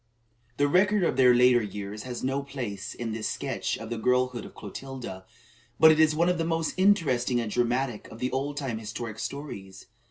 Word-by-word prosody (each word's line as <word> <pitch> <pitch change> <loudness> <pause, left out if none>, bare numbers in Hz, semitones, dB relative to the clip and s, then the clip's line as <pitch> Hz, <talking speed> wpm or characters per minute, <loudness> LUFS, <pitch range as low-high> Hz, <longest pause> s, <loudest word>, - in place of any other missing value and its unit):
The 145 - +3
record 190 +5 +3
of 165 - +1
their 125 -2 +6
later 125 0 +5
years 105 0 -6
has 120 - -5
no 135 +2 0
place 120 -8 -6
in 115 -2 -4
this 110 0 -2
sketch - - -2
of 115 0 -8
the 115 - -2
girlhood 125 0 +1
of - - -12
Clotilda; 110 -3 -8 0.5
but 160 0 +9
it 155 - +2
is 155 -1 +5
one 170 +2 +2
of 180 -1 +1
the - - +1
most 165 -1 -1
interesting 150 -11 +2
and 115 -3 -3
dramatic 120 -1 0
of 110 - -11
the 125 +2 -2
old 140 +2 -2
time 130 -6 -3
historic 110 0 -6
stories. 95 -10 -7
125 Hz, 195 wpm, -27 LUFS, 110-145 Hz, 0.5 s, but